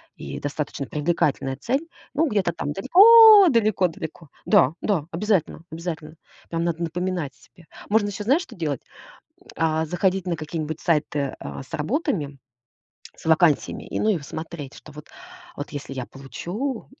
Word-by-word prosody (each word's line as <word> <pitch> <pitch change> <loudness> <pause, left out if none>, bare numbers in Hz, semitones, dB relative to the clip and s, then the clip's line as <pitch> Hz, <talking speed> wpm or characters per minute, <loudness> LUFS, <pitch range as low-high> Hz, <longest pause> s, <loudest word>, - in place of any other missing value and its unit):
и - - -7
достаточно 145 -1 -4
привлекательная 150 -3 0
цель. 270 - -2 0.3
Ну, 320 +3 +2
где-то 195 -5 0
там 145 -2 -4
далеко-далеко-далеко. 250 - +6 0.2
Да, 175 -9 +4
да, 175 -8 0
обязательно, 180 -2 0
обязательно. 160 -2 -6 0.4
Прям 165 0 -2
надо 170 0 -1
напоминать 175 -3 -3
себе. 170 +4 -21 0.2
Можно 205 0 +3
ещё, 205 +1 -5
знаешь, 285 - +3
что - - -13
делать? 150 -7 -3 0.6
М, - - -22
а 160 0 +1
заходить 185 +3 0
на 175 - 0
какие-нибудь 155 0 -5
сайты, 150 -4 0
а, - - -7
с 135 - -20
работами, 160 - -2 0.8
с - - -17
вакансиями, 160 -2 +2
и, - - -4
ну, - - +1
и 195 -6 +1
смотреть, 155 -1 -7
что 150 - -14
вот 150 +2 -11 0.5
вот, - - -6
если 145 -1 -7
я 130 -2 -4
получу 180 - -5
170 Hz, 150 wpm, -23 LUFS, 150-205 Hz, 0.8 s, далеко-далеко-далеко